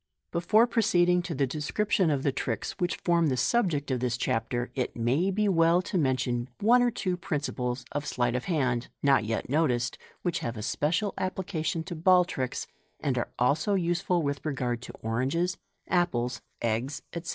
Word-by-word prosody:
Before 210 +7 +4
proceeding 180 -7 +3
to 175 -2 -5
the 135 - +2
description 165 - 0
of 140 -3 0
the 140 - +2
tricks 120 -5 -3
which 175 -1 0
form 170 -2 +2
the 130 -3 0
subject 150 - +1
of 130 - 0
this 120 -1 -1
Chapter, 120 +2 -1
it 130 -2 -2
may 130 +11 +1
be 210 +2 +1
well 165 -2 +4
to 190 - -6
mention 130 -5 0
one 240 +4 +5
or 245 - +4
two 190 -6 -2
principles 130 -7 -3
of 145 0 -3
sleight 120 -1 0
of 125 0 -2
hand, 130 -8 0 0.2
not 135 -6 +4
yet 115 +1 -2
noticed, 125 -5 +1 0.2
which 175 -2 0
have 115 -1 -4
a 105 - -5
special 165 - 0
application 175 -4 -2
to 175 +1 -6
ball 180 +2 +5
tricks, 130 -7 -3 0.3
and 135 -3 0
are 120 - -1
also 155 +11 +2
useful 175 -1 +1
with 140 -1 -2
regard 125 -5 -2
to - - -9
oranges, 135 +11 0 0.3
apples, 130 -9 0 0.2
eggs, 120 +6 -1
etc. 170 -1 -5
150 Hz, 175 wpm, -28 LUFS, 125-180 Hz, 0.3 s, one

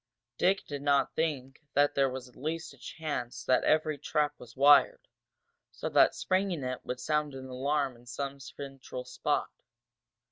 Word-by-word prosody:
Dick 190 +2 +2
did 145 -2 -5
not 140 -1 +2
think 140 -5 -2
that 145 +1 +4
there 135 -1 +3
was 130 0 -6
at 125 - -19
least 160 +4 -4
a - - -18
chance 125 -7 -5
that 130 - +3
every 155 -1 +2
trap 150 0 0
was 120 -1 -13
wired, 145 - +5 0.6
so - - -4
that - - +5
springing 185 -5 0
it 125 0 -4
would 125 - -4
sound 150 +1 0
an 130 0 -7
alarm 135 +1 -1
in 120 +1 -19
some 140 +3 -4
central 130 0 -8
spot. 125 - -1
140 Hz, 165 wpm, -30 LUFS, 130-150 Hz, 0.6 s, wired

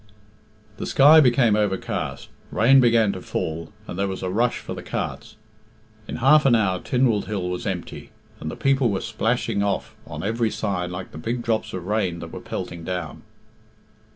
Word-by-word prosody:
XIV. 105 0 -30
The - - -4
sky 150 +4 +7
became 120 -5 +4
overcast, 105 -3 -2 0.2
rain 130 +5 +5
began 115 -4 +4
to - - -7
fall, 80 +1 -4
and 90 - -7
there 100 - +1
was 95 -1 -5
a 90 - -2
rush 115 +5 +1
for - - -7
the - - -7
carts. - - -5 0.7
In - - -5
half 150 +5 +5
an 120 - +5
hour 95 -5 +1
Tynwald 125 -3 +1
Hill 100 -4 -3
was 90 +3 -4
empty, 90 -3 -5 0.3
and 80 - -5
the - - -6
people 135 -2 +2
were 100 -2 -1
splashing 115 -1 -1
off 100 -1 -2
on - - -6
every 115 +2 0
side 95 -5 -2
like 90 +1 -7
the 80 - -9
big 120 +8 -3
drops 110 -2 -1
of 90 -2 -6
rain 100 -4 0
that - - -8
were - - -7
pelting 85 -1 -6
down. 85 -4 -5
105 Hz, 185 wpm, -23 LUFS, 95-120 Hz, 0.7 s, sky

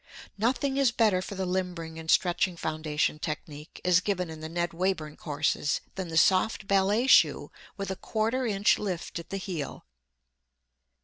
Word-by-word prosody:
Nothing 260 +5 0
is 275 -3 +4
better 215 -6 +2
for 200 - -6
the 190 0 -2
limbering 180 -3 -3
and 160 0 -9
stretching 175 +1 +2
foundation 155 -1 -1
technique, 150 0 -6
as 180 -1 +5
given 180 -3 -2
in 160 - -8
the 160 0 -6
Ned 175 +1 -1
Wayburn 165 -4 -1
courses, 150 0 -1
than 190 -2 -4
the 165 -1 -3
soft 190 +4 +3
ballet 200 +4 +2
shoe 265 - +4 0.3
with 195 -1 -3
a - - -2
quarter 225 +6 -1
inch 205 -1 +3
lift 180 -4 -4
at 170 - -10
the 195 - -3
heel. 180 -7 -5
185 Hz, 165 wpm, -28 LUFS, 160-200 Hz, 0.3 s, as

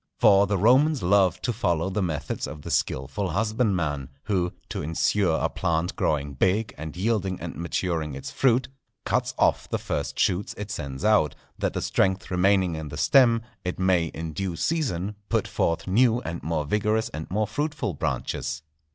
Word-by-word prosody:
For 100 -3 +5
the 100 0 +1
Romans 130 - +4
loved 95 -1 +3
to 120 - 0
follow 90 -5 0
the 105 +2 -1
methods 75 -5 -2
of 75 -2 -9
the - - -5
skilful 90 +9 -1
husbandman, 90 - 0
who, 90 -4 0 0.2
to - - -3
insure 80 +3 +1
a - - +1
plant 85 +2 -1
growing 70 -2 0
big 95 +10 +1
and 80 +1 -7
yielding 95 -2 0
and 85 - -6
maturing 85 -3 -2
its 70 - -6
fruit, 125 -1 +2 0.4
cuts - - 0
off - - +2
the - - 0
first - - -3
shoots 95 +2 0
it 105 0 -5
sends 70 -5 -5
out, 105 -9 +3 0.2
that - - 0
the - - -2
strength 95 +1 0
remaining 95 -1 +3
in 80 -1 -5
the 75 - -7
stem, 115 - +5 0.2
it 90 -1 -3
may 95 -2 +3
in 80 0 -6
due 95 0 -3
season 105 - -1
put - - +1
forth 85 - 0
new 115 +4 +3
and 85 +1 -5
more 80 -2 -1
vigorous 105 +6 +1
and 75 +1 -7
more 105 +3 +1
fruitful 145 - -2
branches. 70 0 -3
95 Hz, 175 wpm, -25 LUFS, 80-105 Hz, 0.4 s, For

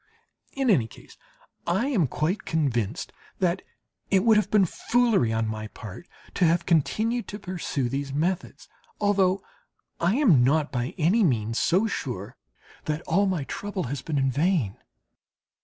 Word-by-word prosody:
In 270 -3 +2
any 125 - +3
case - - -16 0.5
I 190 +8 +1
am 195 - +2
quite 165 - -1
convinced 125 -10 -1 0.2
that 180 0 0 0.5
it 190 -1 +3
would 225 -1 +5
have 210 - +2
been 210 -3 +4
foolery 225 - +1
on 110 0 0
my 110 0 -4
part 105 - -10 0.3
to 180 - +2
have 170 +1 +2
continued 220 - +1
to 205 - -6
pursue 180 - -3
these 135 +2 -3
methods 160 -1 -2 0.3
although 195 -2 +2 0.6
I 175 +5 +2
am 205 - +5
not 150 +3 +2
by 125 -1 -3
any 185 +7 +3
means 115 - +1
so 185 +6 +3
sure 120 - -4 0.5
that 155 +2 -2
all 195 +5 +2
my 180 -6 -1
trouble 200 +6 -4
has 140 - -4
been 150 +2 -3
in 135 -1 +2
vain. 150 - +1
170 Hz, 155 wpm, -26 LUFS, 135-195 Hz, 0.6 s, would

